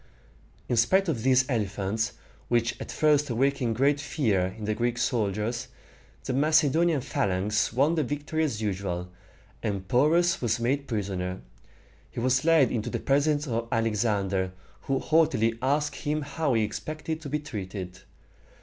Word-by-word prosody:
In 120 - 0
spite 190 - +3
of 130 -8 -1
these 130 +1 +3
elephants, 110 0 -1 0.3
which 120 -1 +1
at - - -6
first 150 -2 +2
awakened 125 -1 +1
great 140 +4 +2
fear 100 - 0
in 110 - -6
the 110 - 0
Greek 120 +2 -1
soldiers, 115 +1 -1 0.6
the 130 - -2
Macedonian 155 +2 +3
phalanx 100 0 0
won 140 +8 +2
the 160 -2 +1
victory 145 +4 -2
as 110 -8 -2
usual, 95 -3 -3 0.5
and 100 -4 -3
Porus 165 - +3
was 115 -2 0
made 140 +4 0
prisoner. 95 -5 -3 0.7
He - - -6
was 130 +3 +2
led 160 -6 +4
into 115 0 -2
the - - -3
presence 145 +2 +1
of 115 -2 -2
Alexander, 100 -5 0 0.3
who 135 - +1
haughtily 135 -7 +2
asked 145 +3 0
him 150 0 -2
how 145 -2 -1
he 110 - +3
expected 155 +8 -4
to 145 - -7
be 150 - 0
treated. 95 -9 -6
120 Hz, 150 wpm, -27 LUFS, 105-145 Hz, 0.7 s, led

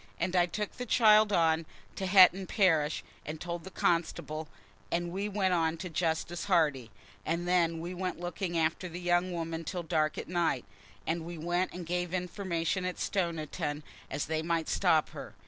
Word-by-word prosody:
And 180 +2 -1
I 175 -1 +4
took 210 +3 -3
the 250 - -5
child 215 -2 +6
on 165 -3 +2 0.3
to 190 - -3
Hetton 185 0 +6
parish 160 -7 +2 0.2
and 155 +1 -6
told 170 0 -5
the 190 - -8
constable, 160 -3 -1 0.4
and 175 0 -1
we 200 +3 -2
went 190 -2 +1
on 165 -1 +1
to 180 +1 -6
Justice 165 +1 -1
Hardy. 150 - +2 0.3
And 170 +2 -2
then 170 -2 +2
we 175 +2 -5
went 180 -1 -3
looking 175 0 -3
after 165 +3 0
the 170 +1 -6
young 175 +1 +1
woman 165 -1 -3
till 175 +2 -4
dark 155 -1 0
at - - -5
night, 170 -7 0 0.4
and 165 0 -1
we 170 +1 -7
went 175 +3 0
and 180 -1 -7
gave 175 +1 -2
information 180 -1 -2
at 180 0 -3
Stoniton, 155 -5 -2 0.3
as 145 - -2
they 160 0 -1
might 165 0 -1
stop 165 -5 +3
her. - - -9
175 Hz, 180 wpm, -30 LUFS, 160-185 Hz, 0.4 s, child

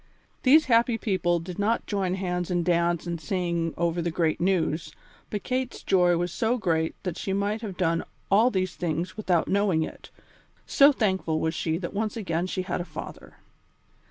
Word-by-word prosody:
These 300 +4 +6
happy 235 -1 +3
people 180 -6 +1
did 175 +2 -8
not 220 +3 +1
join 190 -3 -1
hands 180 -2 -2
and 175 -2 0
dance 170 -1 +1
and 170 -2 -4
sing 170 0 -1
over 170 0 0
the 170 - -1
great 165 -1 0
news, 170 -4 0 0.4
but 210 - -4
Kate's 255 0 -3
joy 180 -2 +3
was 175 0 -1
so 235 +2 +1
great 165 -6 0
that 180 -4 -4
she 195 - -2
might 205 +2 -1
have 200 -5 -6
done 165 -3 +1 0.3
all 220 +5 +5
these 185 -5 -1
things 170 0 -2
without 185 -6 +1
knowing 195 -5 +2
it, - - -9 0.6
so 280 +1 +6
thankful 190 - 0
was 160 0 0
she 160 -1 -1
that 175 -1 -5
once 215 +2 -2
again 175 -4 -1
she 185 0 -2
had 180 -1 -2
a - - -2
father. - - -9
180 Hz, 185 wpm, -26 LUFS, 170-205 Hz, 0.6 s, These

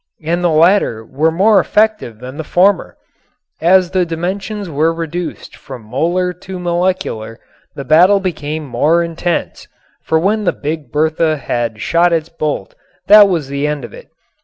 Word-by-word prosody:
And 170 +3 -1
the 175 - +3
latter 160 - +2
were 150 +7 0
more 195 +6 +3
effective 215 - 0
than 130 +4 -9
the 160 - -4
former. 185 +5 +1 0.6
As 180 +2 +4
the 185 -1 +2
dimensions 190 +5 -4
were 160 +1 +1
reduced 165 +1 -6
from 130 -5 -11
molar 170 +10 -1
to 190 -1 -7
molecular 175 -11 -2 0.4
the 140 - -7
battle 180 +8 +5
became 155 -4 -4
more 150 +7 +1
intense. 170 +1 -3 0.3
For 160 - 0
when 205 +6 0
the 180 - +1
Big 150 -3 -5
Bertha 155 +1 +1
had 120 -5 -3
shot 170 +1 +2
its 165 0 -1
bolt, 155 -3 -4 0.3
that 205 0 +8
was 165 -7 -1
the 140 +1 -2
end 150 -4 -3
of - - -12
it. - - -13
165 Hz, 160 wpm, -15 LUFS, 150-180 Hz, 0.6 s, that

